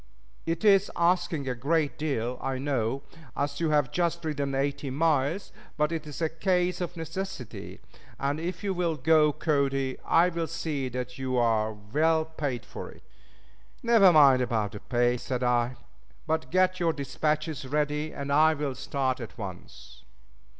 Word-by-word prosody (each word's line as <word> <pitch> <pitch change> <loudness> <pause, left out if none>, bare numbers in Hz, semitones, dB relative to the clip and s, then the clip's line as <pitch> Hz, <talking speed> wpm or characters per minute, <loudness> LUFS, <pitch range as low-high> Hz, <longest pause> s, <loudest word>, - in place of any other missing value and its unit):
It 165 +5 -1
is 200 -1 +5
asking 170 -4 +1
a 130 - 0
great 145 +4 0
deal, 125 -5 -2
I 135 -1 -2
know, 135 -1 -1 0.3
as 140 0 -2
you 165 - +1
have 145 -4 +2
just 170 -1 -1
ridden 140 -3 -2
eighty 140 0 -1
miles; 155 +5 +1 0.3
but 150 +1 +1
it 160 -2 -4
is 150 +3 -5
a - - +3
case 180 +1 0
of 175 0 -4
necessity, 165 - -6 0.4
and 140 +2 -1
if 175 +2 -4
you'll 180 -5 0
go, 150 +1 +4
Cody, 135 -3 0
I'll 170 -1 +2
see 145 -6 -3
that 125 +1 -5
you 130 -1 -1
are 110 -2 +2
well 155 +10 +1
paid 145 -7 -4
for - - -8
it." - - -16 0.8
"Never 225 -6 +6
mind 140 -5 +6
about 110 -4 0
the 105 - -8
pay," 120 +1 +1
said 125 +1 -3
I, 125 0 +1 0.5
"but 160 -4 -1
get 185 +2 +2
your 165 -2 +2
dispatches 150 +1 -2
ready 150 +2 -1
and 140 0 -5
I'll 150 -2 +3
start 130 0 -2
at 115 +1 -8
once." 65 - -9
145 Hz, 155 wpm, -28 LUFS, 130-165 Hz, 0.8 s, Never